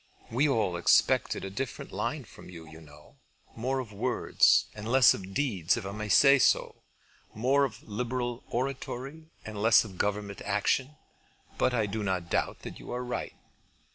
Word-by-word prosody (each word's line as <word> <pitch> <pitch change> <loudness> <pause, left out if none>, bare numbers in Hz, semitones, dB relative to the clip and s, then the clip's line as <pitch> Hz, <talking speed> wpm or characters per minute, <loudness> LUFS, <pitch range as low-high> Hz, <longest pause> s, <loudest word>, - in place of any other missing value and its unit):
We 135 +6 +2
all 105 -9 0
expected 85 - +2
a 95 - -6
different 130 +5 -5
line - - -3
from - - -14
you, 85 -3 -11
you 80 +1 -13
know, 75 -1 -17 0.4
more 130 +4 -2
of 120 -5 -5
words 100 - +3
and 105 +2 -6
less 130 -2 +7
of 95 0 -8
deeds, 105 - +1
if 115 - -5
I 100 - -4
may 105 +1 -5
say 140 +5 +6
so; - - +2 0.5
more 135 +6 +3
of 110 -6 -8
liberal 120 +2 -3
oratory 135 +4 -4 0.2
and 105 -1 -6
less 115 +1 +6
of 95 -4 -11
government 100 -1 -2
action; 105 +8 0 0.6
but 125 - +2
I 110 -3 +1
do 105 +2 -4
not 95 -4 -2
doubt - - -1
that - - -8
you - - -9
are 125 +1 -3
right." 125 0 -4
110 Hz, 170 wpm, -29 LUFS, 100-130 Hz, 0.6 s, less